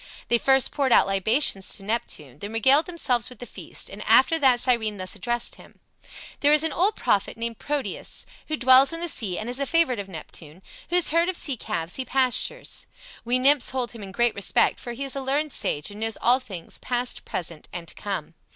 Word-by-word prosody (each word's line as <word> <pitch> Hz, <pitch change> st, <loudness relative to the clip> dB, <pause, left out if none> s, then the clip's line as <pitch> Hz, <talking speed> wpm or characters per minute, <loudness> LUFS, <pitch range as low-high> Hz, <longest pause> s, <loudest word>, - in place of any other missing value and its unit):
They 235 Hz, -, +4 dB
first 265 Hz, 0 st, +3 dB
poured 275 Hz, -3 st, 0 dB
out -, -, +6 dB
libations 195 Hz, +1 st, +1 dB
to 195 Hz, -, -7 dB
Neptune, 195 Hz, -, -4 dB
then 205 Hz, +5 st, -7 dB
regaled 265 Hz, -, +4 dB
themselves 255 Hz, -10 st, 0 dB
with 250 Hz, -, -13 dB
the 245 Hz, -, -8 dB
feast, -, -, -6 dB
and -, -, -8 dB
after 325 Hz, -1 st, +5 dB
that 260 Hz, -4 st, +4 dB
Cyrene 230 Hz, -5 st, +1 dB
thus 185 Hz, -1 st, -3 dB
addressed 240 Hz, +4 st, -2 dB
him: -, -, -19 dB, 0.6 s
"There 290 Hz, -, +3 dB
is 300 Hz, 0 st, +5 dB
an 320 Hz, -, -1 dB
old 400 Hz, +5 st, +1 dB
prophet 200 Hz, +2 st, 0 dB
named 230 Hz, -1 st, -5 dB
Proteus, 290 Hz, -1 st, -3 dB, 0.2 s
who 310 Hz, -, -2 dB
dwells 260 Hz, +2 st, +6 dB
in 330 Hz, -, -4 dB
the 345 Hz, -, -3 dB
sea 210 Hz, -, -1 dB
and 215 Hz, -, -5 dB
is 250 Hz, +2 st, -1 dB
a 280 Hz, -, -1 dB
favorite 330 Hz, -9 st, +2 dB
of 195 Hz, -1 st, -6 dB
Neptune, 160 Hz, 0 st, -10 dB, 0.3 s
whose 355 Hz, -1 st, +3 dB
herd 335 Hz, +2 st, +2 dB
of 370 Hz, -, -2 dB
sea 280 Hz, -, 0 dB
calves 165 Hz, -6 st, -4 dB
he 260 Hz, -, -2 dB
pastures. 265 Hz, -, 0 dB, 0.4 s
We 245 Hz, +2 st, +2 dB
nymphs 275 Hz, +1 st, +4 dB
hold 255 Hz, -2 st, -2 dB
him 230 Hz, -, -11 dB
in 195 Hz, -1 st, -8 dB
great 240 Hz, +3 st, +2 dB
respect, 200 Hz, -, +1 dB
for 240 Hz, -, -6 dB
he 260 Hz, +4 st, -5 dB
is 275 Hz, 0 st, -4 dB
a 275 Hz, -, -3 dB
learned 280 Hz, +3 st, -1 dB
sage 150 Hz, +6 st, -1 dB
and 205 Hz, -, -10 dB
knows 225 Hz, 0 st, -1 dB
all 250 Hz, +2 st, +4 dB
things, 190 Hz, -10 st, -9 dB
past, 245 Hz, 0 st, -3 dB
present, 165 Hz, -3 st, -5 dB
and 170 Hz, -1 st, -7 dB
to -, -, -7 dB
come. 190 Hz, -6 st, -5 dB
245 Hz, 215 wpm, -24 LUFS, 205-275 Hz, 0.6 s, out